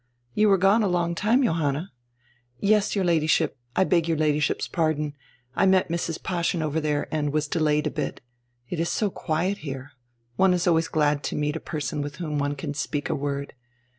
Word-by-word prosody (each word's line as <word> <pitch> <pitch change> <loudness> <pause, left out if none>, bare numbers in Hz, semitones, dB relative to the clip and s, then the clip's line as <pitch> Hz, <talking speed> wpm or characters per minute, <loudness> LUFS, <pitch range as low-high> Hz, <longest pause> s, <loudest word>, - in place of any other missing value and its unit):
"You 215 0 +4
were 195 - +5
gone 195 +4 +4
a 210 - +2
long 175 -2 0
time, 225 +9 +2
Johanna." 160 - 0 0.7
"Yes, 210 0 +2
your 195 -2 +1
Ladyship 160 -2 +2
— 120 - -39
I - - +4
beg 170 -3 +2
your 165 -2 +1
Ladyship's 150 -1 +1
pardon 155 -3 0 0.2
— 120 +2 -37
I - - +3
met 190 -2 +3
Mrs. 165 -1 -3
Paaschen 170 -2 -1
over 155 +1 -1
there 150 -1 -1
and 150 -2 0
was 150 0 0
delayed 150 -1 +1
a - - 0
bit. - - -3 0.5
It 170 - -4
is 170 - 0
so 210 -3 0
quiet 175 +5 -1
here. 135 -1 -7 0.5
One 190 -1 +4
is 175 - -1
always 165 -1 +3
glad 150 -2 +1
to - - -2
meet 150 0 -1
a - - -2
person 150 -1 -3
with 145 0 -5
whom 150 -4 -3
one 145 0 -1
can 145 +1 -4
speak 145 0 -2
a - - 0
word. 140 0 -3
160 Hz, 205 wpm, -25 LUFS, 145-180 Hz, 0.7 s, were